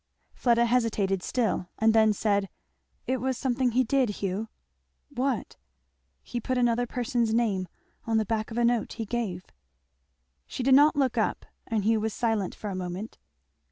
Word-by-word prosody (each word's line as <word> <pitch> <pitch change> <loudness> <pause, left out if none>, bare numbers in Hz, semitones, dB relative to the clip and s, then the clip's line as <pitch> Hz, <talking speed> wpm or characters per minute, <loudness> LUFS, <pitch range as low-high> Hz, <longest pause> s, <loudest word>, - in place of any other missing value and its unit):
Fleda 235 -1 +3
hesitated 220 -6 +1
still, 210 -5 -1
and 220 0 +3
then 220 -1 +5
said, 200 -1 0 0.6
"It 260 - 0
was 260 0 -2
something 255 -2 0
he 255 +2 +4
did, 255 0 +2
Hugh." 200 +1 -3 0.6
"What?" 265 -3 -2 0.7
"He 240 - -4
put 255 +2 -2
another 245 0 +2
person's 240 -2 0
name 200 -6 +1 0.4
on 225 -1 +1
the 220 - +1
back 220 0 -2
of 230 - -6
a 240 - +3
note 235 -2 +1
he 225 - -4
gave." 200 -5 -3 1.0
She 255 - -4
did 265 +1 +4
not 295 +3 +6
look 270 -4 +1
up, - - -1 0.2
and 220 -3 -1
Hugh 220 +1 +3
was 220 -1 -2
silent 220 -6 -1
for 210 - -5
a - - -4
moment. 185 +4 -5
230 Hz, 165 wpm, -27 LUFS, 210-245 Hz, 1.0 s, not